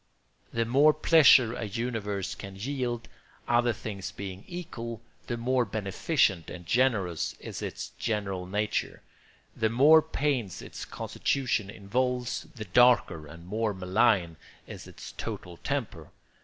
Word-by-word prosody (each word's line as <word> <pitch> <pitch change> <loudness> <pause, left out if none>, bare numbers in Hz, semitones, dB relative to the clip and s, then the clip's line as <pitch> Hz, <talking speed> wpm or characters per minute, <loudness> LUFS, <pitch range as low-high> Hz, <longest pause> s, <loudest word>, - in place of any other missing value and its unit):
The 115 0 0
more 140 +6 +5
pleasure 145 -7 +6
a 115 - -4
universe 105 -3 -3
can 100 -2 -9
yield, 120 0 -3 0.4
other 120 0 +3
things 105 -3 -6
being 95 0 -7
equal, 120 - -6 0.3
the 120 - -2
more 125 +2 +1
beneficent 100 - 0
and 90 -1 -9
generous 100 - +1
is - - -7
its - - -5
general 100 -4 -2
nature; 105 +2 -2 0.5
the 110 - +1
more 145 +7 +7
pains 140 - -1
its - - -8
constitution 120 -7 -1
involves, 125 +5 -2
the 110 -3 -6
darker 95 -7 +4
and 85 +3 -12
more 105 +2 -1
malign 95 -3 +2 0.3
is - - -9
its - - -10
total 90 -1 -6
temper. 115 - -4
115 Hz, 130 wpm, -28 LUFS, 95-125 Hz, 0.5 s, more